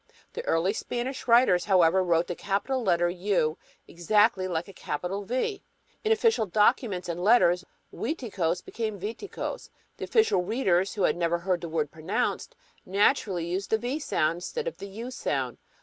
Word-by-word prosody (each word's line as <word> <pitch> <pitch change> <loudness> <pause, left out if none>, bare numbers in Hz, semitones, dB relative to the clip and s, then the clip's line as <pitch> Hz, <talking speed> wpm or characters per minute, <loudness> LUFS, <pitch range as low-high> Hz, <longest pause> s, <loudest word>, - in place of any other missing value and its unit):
The 475 - -5
early 175 +5 +2
Spanish 245 +4 -4
writers, 235 -7 +5
however, 185 -2 +4
wrote 170 -1 +2
the 175 - -4
capital 205 +9 -1
letter 175 -5 +2
U 175 -3 0 0.3
exactly 205 +2 +2
like 175 -1 -2
a 195 - -11
capital 180 +5 -4
V. 260 - -2 0.4
In 440 - +1
official 445 - +3
documents 205 -1 +2
and 175 +1 -3
letters 185 -5 +4 0.3
Uiticos 190 - -2
became 215 -3 -4
Viticos. 225 - -5 0.3
The - - -4
official 440 - +3
readers, 190 -2 +1
who 200 - -1
had - - +3
never 170 0 0
heard 175 0 -1
the 170 - -5
word 155 -2 -1
pronounced, 160 +4 -2 0.3
naturally 195 -2 +1
used 185 +3 -3
the 220 - +3
V 245 +6 -3
sound 170 - 0
instead 470 - -4
of - - -4
the 200 - -7
U 225 +6 -7
sound. 135 - -2
195 Hz, 165 wpm, -27 LUFS, 175-235 Hz, 0.4 s, writers